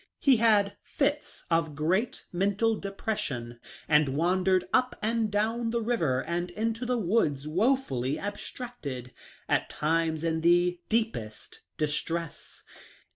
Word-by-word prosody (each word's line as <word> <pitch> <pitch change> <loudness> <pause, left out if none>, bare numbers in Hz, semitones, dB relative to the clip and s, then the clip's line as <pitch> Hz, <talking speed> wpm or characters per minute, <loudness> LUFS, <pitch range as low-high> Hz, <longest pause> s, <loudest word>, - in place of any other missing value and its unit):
He 270 -4 +4
had 210 -3 +3
fits 290 +1 -2
of 165 -3 +1
great 180 - 0
mental 205 +5 +2
depression, 150 - -4 0.3
and 150 -1 +4
wandered 180 +5 +2
up 255 0 +3
and 225 0 0
down 225 +3 0
the 235 +1 0
river 160 - +1
and 175 +1 -2
into 225 +5 -2
the 250 0 +1
woods 170 - +1
woefully 155 - +1
abstracted 195 - -6 0.2
— - - -26
at - - +1
times 160 0 0
in 160 -1 0
the 175 +1 +3
deepest 220 - -2 0.2
distress. 155 +1 -3
180 Hz, 125 wpm, -28 LUFS, 155-225 Hz, 0.3 s, He